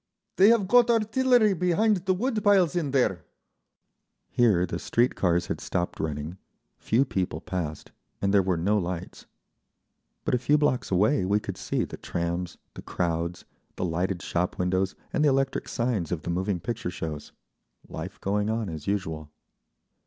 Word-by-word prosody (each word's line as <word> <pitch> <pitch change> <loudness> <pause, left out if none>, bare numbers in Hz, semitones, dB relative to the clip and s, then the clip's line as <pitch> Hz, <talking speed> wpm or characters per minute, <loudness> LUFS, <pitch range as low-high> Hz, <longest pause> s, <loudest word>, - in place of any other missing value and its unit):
They 195 +3 +7
have 230 -5 +3
got 240 +2 +5
artillery 230 0 +3
behind 190 +5 +2
the 185 - +3
wood 220 +1 -1
piles 190 -4 +4
in 165 -5 0
there…." 110 - +1 1.1
Here 105 -8 +3
the 90 - -4
street 120 +2 +1
cars 85 -2 +1
had - - -4
stopped 90 0 -2
running, 80 +3 -4 0.4
few 125 +5 +2
people 95 -7 -2
passed, 80 -5 -5 0.3
and 100 0 0
there 100 - +6
were 90 -2 0
no 100 +6 +2
lights; 90 -2 -5 1.0
but - - 0
a 125 - +3
few 145 +4 +3
blocks 145 -4 +1
away 105 +9 +3
we 100 +3 +2
could - - -6
see - - -2
the - - -9
trams, 85 +1 -3 0.2
the - - -9
crowds, 85 0 -2 0.3
the - - -2
lighted 90 +1 -1
shop 90 +1 -1
windows 95 +1 0 0.2
and 150 - +2
the 150 - +5
electric 135 0 0
signs 115 - -1
of 80 -3 -2
the 85 - -2
moving 95 +1 -1
picture 115 -1 -4
shows—life 80 +1 -9
going 105 +2 0
on 110 -2 -1
as 80 -2 -7
usual. 80 -7 -2
100 Hz, 160 wpm, -27 LUFS, 85-145 Hz, 1.1 s, They